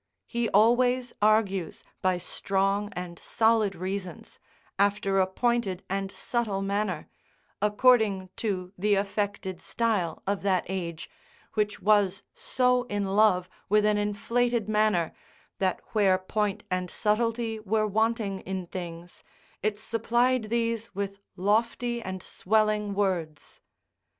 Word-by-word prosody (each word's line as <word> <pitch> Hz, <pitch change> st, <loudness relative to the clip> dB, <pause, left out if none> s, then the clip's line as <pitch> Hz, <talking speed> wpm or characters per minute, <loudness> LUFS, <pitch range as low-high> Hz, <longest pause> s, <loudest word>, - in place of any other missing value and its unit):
He 235 Hz, -1 st, -1 dB
always 245 Hz, +4 st, +3 dB
argues 205 Hz, -4 st, +2 dB, 0.2 s
by 185 Hz, -1 st, +2 dB
strong 195 Hz, +3 st, -1 dB
and 175 Hz, -1 st, -6 dB
solid 220 Hz, -3 st, +2 dB
reasons, 185 Hz, +1 st, -5 dB, 0.4 s
after 200 Hz, -1 st, +2 dB
a 185 Hz, -, +3 dB
pointed 210 Hz, -2 st, 0 dB
and 195 Hz, 0 st, -2 dB
subtle 210 Hz, -5 st, -2 dB
manner, 200 Hz, -4 st, -1 dB, 0.5 s
according 210 Hz, -3 st, +3 dB
to 185 Hz, -4 st, -3 dB
the 205 Hz, +2 st, +3 dB
affected 200 Hz, -1 st, -2 dB
style 215 Hz, -8 st, -1 dB
of 200 Hz, 0 st, -1 dB
that 190 Hz, -2 st, +1 dB
age, 170 Hz, -4 st, -4 dB, 0.5 s
which 210 Hz, -3 st, -1 dB
was 205 Hz, -2 st, +3 dB
so 250 Hz, -1 st, +1 dB
in 205 Hz, -4 st, -2 dB
love 195 Hz, -4 st, +4 dB, 0.2 s
with 210 Hz, +1 st, +4 dB
an 210 Hz, 0 st, +3 dB
inflated 230 Hz, +2 st, 0 dB
manner, 210 Hz, -6 st, +2 dB, 0.5 s
that 185 Hz, -2 st, +1 dB
where 195 Hz, -4 st, +4 dB
point 200 Hz, +2 st, -2 dB
and 185 Hz, 0 st, -1 dB
subtlety 225 Hz, +2 st, 0 dB
were 215 Hz, +1 st, +1 dB
wanting 215 Hz, -1 st, 0 dB
in 190 Hz, -1 st, -4 dB
things 170 Hz, -1 st, -8 dB, 0.4 s
it 210 Hz, 0 st, 0 dB
supplied 235 Hz, +2 st, +1 dB
these 230 Hz, -1 st, -2 dB
with 200 Hz, 0 st, -3 dB, 0.2 s
lofty 230 Hz, +4 st, 0 dB
and 190 Hz, -3 st, -6 dB
swelling 210 Hz, 0 st, +1 dB
words. 175 Hz, -7 st, -2 dB
205 Hz, 120 wpm, -27 LUFS, 190-220 Hz, 0.5 s, love